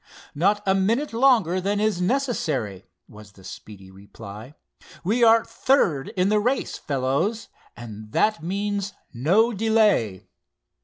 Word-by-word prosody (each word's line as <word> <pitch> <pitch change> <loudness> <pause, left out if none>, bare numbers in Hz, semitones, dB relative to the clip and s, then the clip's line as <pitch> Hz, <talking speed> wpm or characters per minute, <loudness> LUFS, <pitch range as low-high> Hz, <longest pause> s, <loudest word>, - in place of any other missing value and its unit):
"Not 200 +7 +1
a 190 - +3
minute 225 +9 0
longer 225 -8 +3
than 200 +2 -1
it - - 0
is 215 -4 0
necessary," 165 - -2 0.2
was 105 -1 -15
the 95 - -18
speedy 95 0 -11
reply. 100 +6 -12 0.5
"We 225 +7 +1
are 230 0 +5
third 225 - +1
in 185 +2 +2
the 210 0 +3
race, 250 +6 -1
fellows, 145 - -2 0.3
and 110 -2 -10
that 215 - +1
means 200 +3 -3 0.2
no 190 - +2
delay." 210 - +1
190 Hz, 135 wpm, -23 LUFS, -, 0.5 s, are